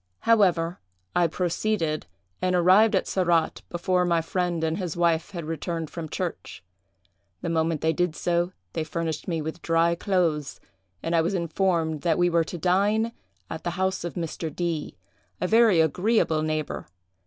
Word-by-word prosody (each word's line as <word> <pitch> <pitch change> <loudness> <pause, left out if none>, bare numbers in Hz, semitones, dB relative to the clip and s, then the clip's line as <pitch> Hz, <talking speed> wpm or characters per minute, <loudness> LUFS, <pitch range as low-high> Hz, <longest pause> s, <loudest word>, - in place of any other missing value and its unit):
However, 180 -7 +3 0.4
I 175 - +4
proceeded, 170 - -1 0.3
and 185 0 +1
arrived 185 +5 +5
at - - +1
Sarratt 170 -4 +1
before 180 +1 +1
my 170 -2 +2
friend 175 0 -1
and 160 +2 0
his 175 -3 -4
wife 170 0 +2
had 175 -5 -6
returned 165 0 -4
from 165 -2 -6
church. - - -5 0.8
The 170 - -1
moment 160 -1 0
they 160 0 +2
did 175 -2 0
so, 175 +1 0 0.2
they 160 - -1
furnished 160 -1 -3
me 165 -4 -1
with 160 +2 -5
dry 165 0 +2
clothes, 170 -5 0 0.4
and 165 +1 0
I 165 - +5
was 175 +5 0
informed 170 -3 0
that 170 -2 +1
we 175 0 +3
were 170 0 +3
to 175 - -6
dine 200 +6 +2 0.4
at 160 - -6
the 175 - -1
house 190 -1 0
of 175 - -5
Mr. 165 -1 -3
D——, 170 -2 -3 0.4
a - - -1
very 220 -2 +5
agreeable 170 0 +2
neighbor. 155 -1 -3
170 Hz, 165 wpm, -26 LUFS, 160-180 Hz, 0.8 s, arrived